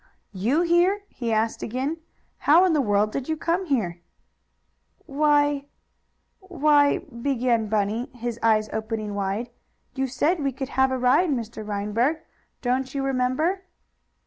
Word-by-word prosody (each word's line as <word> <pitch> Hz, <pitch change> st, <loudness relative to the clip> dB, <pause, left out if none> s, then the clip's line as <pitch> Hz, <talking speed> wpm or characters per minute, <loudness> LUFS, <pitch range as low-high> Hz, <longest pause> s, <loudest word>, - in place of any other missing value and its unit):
"You 230 Hz, -, +1 dB
here?" 350 Hz, +4 st, +3 dB
he 235 Hz, -2 st, -4 dB
asked 220 Hz, +1 st, 0 dB
again. 265 Hz, +7 st, -2 dB, 0.4 s
"How 330 Hz, +6 st, +5 dB
in 360 Hz, -, +2 dB
the 300 Hz, -, +3 dB
world 210 Hz, -2 st, +1 dB
did 275 Hz, +4 st, -4 dB
you 315 Hz, -, 0 dB
come 340 Hz, +4 st, -1 dB
here?" 180 Hz, -, -1 dB, 1.0 s
"Why 290 Hz, -1 st, +2 dB, 0.7 s
why," 300 Hz, -6 st, +3 dB
began 240 Hz, -3 st, -1 dB
Bunny, 215 Hz, +3 st, -1 dB
his 240 Hz, -1 st, -4 dB
eyes 215 Hz, -1 st, +3 dB
opening 220 Hz, -1 st, -3 dB
wide. 200 Hz, +4 st, -3 dB, 0.4 s
"You 265 Hz, 0 st, -1 dB
said 300 Hz, +7 st, 0 dB
we 275 Hz, -1 st, 0 dB
could 270 Hz, +1 st, -5 dB
have 265 Hz, +1 st, +2 dB
a 260 Hz, -, 0 dB
ride, 255 Hz, +8 st, +3 dB
Mr. 230 Hz, -5 st, -3 dB
Reinberg. 210 Hz, +8 st, 0 dB, 0.5 s
Don't 255 Hz, +2 st, -1 dB
you 275 Hz, -, -1 dB
remember?" 270 Hz, +8 st, 0 dB
255 Hz, 140 wpm, -24 LUFS, 220-295 Hz, 1.0 s, How